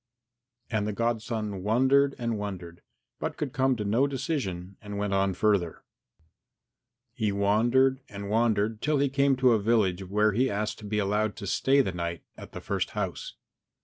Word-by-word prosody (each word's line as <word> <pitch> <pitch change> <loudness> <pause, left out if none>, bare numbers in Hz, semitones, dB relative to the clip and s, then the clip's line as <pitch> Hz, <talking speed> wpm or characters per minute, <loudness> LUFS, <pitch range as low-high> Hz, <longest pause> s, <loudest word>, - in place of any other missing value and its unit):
And 105 -2 0
the 105 - -2
godson 110 -3 -2
wondered 130 +7 +3
and 115 -1 -2
wondered, 90 -4 -6 0.4
but - - -4
could 140 -4 -3
come 130 -2 +2
to 105 -3 -4
no 115 +7 +2
decision 120 - -3
and 105 -2 -7
went 100 -1 -1
on 95 -1 +1
further. 100 -5 0 1.4
VIII 110 - 0
He - - +2
wandered 120 +7 +2
and 100 0 -7
wandered 110 0 +1
till 150 0 +1
he 140 0 +2
came 140 0 +2
to 130 -1 +4
a 110 - +3
village 100 -4 +1
where 105 +3 +2
he 125 +6 +1
asked 105 +1 -2
to 105 - -10
be 105 +1 -2
allowed 105 +1 0
to 100 - -7
stay 135 +8 +3
the 110 - -1
night 85 -2 -4
at - - -12
the - - -7
first - - -2
house. - - -4
105 Hz, 180 wpm, -27 LUFS, 100-130 Hz, 1.4 s, to